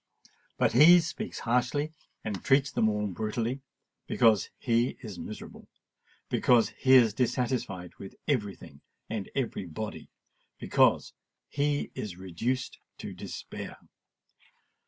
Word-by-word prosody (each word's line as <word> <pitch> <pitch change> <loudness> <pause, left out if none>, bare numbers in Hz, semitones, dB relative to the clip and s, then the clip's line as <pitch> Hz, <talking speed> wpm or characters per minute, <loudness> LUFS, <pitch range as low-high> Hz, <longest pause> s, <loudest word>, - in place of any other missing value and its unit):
But - - +3
he 165 +8 +9
speaks 170 +6 -4
harshly 145 +6 0 0.3
and 105 -3 -4
treats 135 0 +3
them 110 - +2
all 105 0 -1
brutally, 110 +6 -2 0.5
because 110 -4 +3
he 120 0 +1
is 105 -6 -7
miserable—because 110 +4 -2
he 130 -1 +2
is 120 -5 +7
dissatisfied 120 -7 -1
with 95 - -9
every 105 - 0
thing 70 -3 -14 0.3
and 105 -4 -3
every 120 -8 -2
body—because 105 +7 -1 0.4
he 145 0 0
is 95 -5 -6
reduced 105 +8 -3 0.2
to - - -7
despair. - - -7
115 Hz, 110 wpm, -29 LUFS, 105-130 Hz, 0.5 s, he